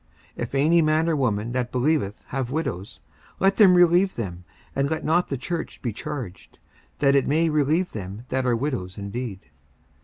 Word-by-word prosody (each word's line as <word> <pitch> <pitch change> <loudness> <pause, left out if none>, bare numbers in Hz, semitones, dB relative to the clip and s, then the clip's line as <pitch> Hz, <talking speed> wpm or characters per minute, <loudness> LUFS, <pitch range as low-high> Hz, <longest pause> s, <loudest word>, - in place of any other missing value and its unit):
54:005:016 - - -4
If 120 - -5
any 160 +5 +4
man 155 +1 +2
or 165 - +2
woman 115 -5 0
that 125 -1 -2
believeth 130 -5 0
have 130 -2 -2
widows, 130 - -4 0.4
let 195 +1 +3
them 195 -4 +7
relieve 180 +2 +4
them, 90 -6 -5 0.3
and 140 +1 +1
let 160 0 -2
not 170 +3 +2
the 140 - -3
church 165 +6 -5
be 120 -4 -2
charged; 125 - -7 0.4
that 140 -1 +3
it 140 - +3
may 160 +3 +2
relieve 155 +4 +1
them 100 +2 -7
that 130 0 0
are 120 - +3
widows 115 -8 -3
indeed. 100 0 -5
135 Hz, 180 wpm, -24 LUFS, 115-160 Hz, 0.4 s, them